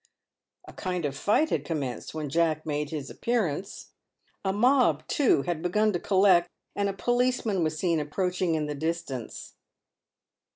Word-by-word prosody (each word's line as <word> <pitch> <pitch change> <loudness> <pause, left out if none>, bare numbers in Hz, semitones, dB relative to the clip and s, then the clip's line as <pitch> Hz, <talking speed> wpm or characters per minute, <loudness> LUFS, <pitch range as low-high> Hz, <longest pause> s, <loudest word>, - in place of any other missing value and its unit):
A - - -11
kind 180 -4 -3
of 140 -1 -2
fight 215 - +2
had - - 0
commenced 145 -4 -4
when 155 -2 -3
Jack 155 +1 +1
made 150 -1 -2
his 150 -4 -5
appearance. 200 -6 -2 0.5
A 190 - +1
mob, 250 +6 +3
too, 255 - +3
had 175 -3 -2
begun 210 +5 +2
to 175 - -1
collect, 185 -2 +4 0.3
and 200 0 0
a - - -2
policeman 240 -2 +1
was 155 0 -1
seen 170 -1 +1
approach 180 +5 -2
ing 170 -3 +2
in 155 -1 -1
the 150 - -3
distance. 155 -5 -4
175 Hz, 160 wpm, -27 LUFS, 155-200 Hz, 0.5 s, collect